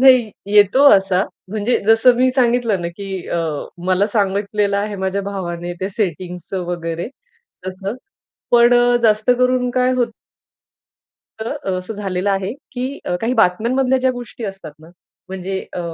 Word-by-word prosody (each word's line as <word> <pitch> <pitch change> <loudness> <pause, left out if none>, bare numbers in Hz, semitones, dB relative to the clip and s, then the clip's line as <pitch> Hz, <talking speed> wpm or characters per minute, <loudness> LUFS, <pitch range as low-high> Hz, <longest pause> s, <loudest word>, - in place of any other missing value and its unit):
नाही 255 -4 +6 0.2
येतो 205 +5 +5
असा 195 -2 +3 0.3
म्हणजे 215 +4 0
जसं 225 +3 +6
मी 255 +1 +3
सांगितलं 240 -5 +1
ना, 170 - -2
की 195 -3 -6
अ, - - -1 0.5
मला 185 +2 +3
सांगितलेलं 200 -1 0
आहे 205 0 -2
माझ्या 190 +1 -2
भावाने 175 -3 -4
त्या 190 - -1
सेटिंग्सच 180 -4 -4
वगैरे 170 +1 -4 0.6
तसं. 190 +3 -4 0.6
पण 240 0 +6
अ, 245 0 +4
जास्त 215 +1 +3
करून 250 0 +2
काय 255 +1 +2
होतं 245 -2 0 1.3
तर 220 - -3 0.3
असं 185 +4 -6
झालेलं 195 -1 -2
आहे, 195 +1 -1 0.2
की 260 +3 -4 0.2
काही 230 +2 0
बातम्यांमधल्या 250 +6 +2
ज्या 260 0 +2
गोष्टी 245 -1 -8
असतात 195 -6 -7
ना, 160 +1 -16 0.4
म्हणजे 190 0 -4
अ, - - -4
205 Hz, 145 wpm, -19 LUFS, 190-245 Hz, 1.3 s, नाही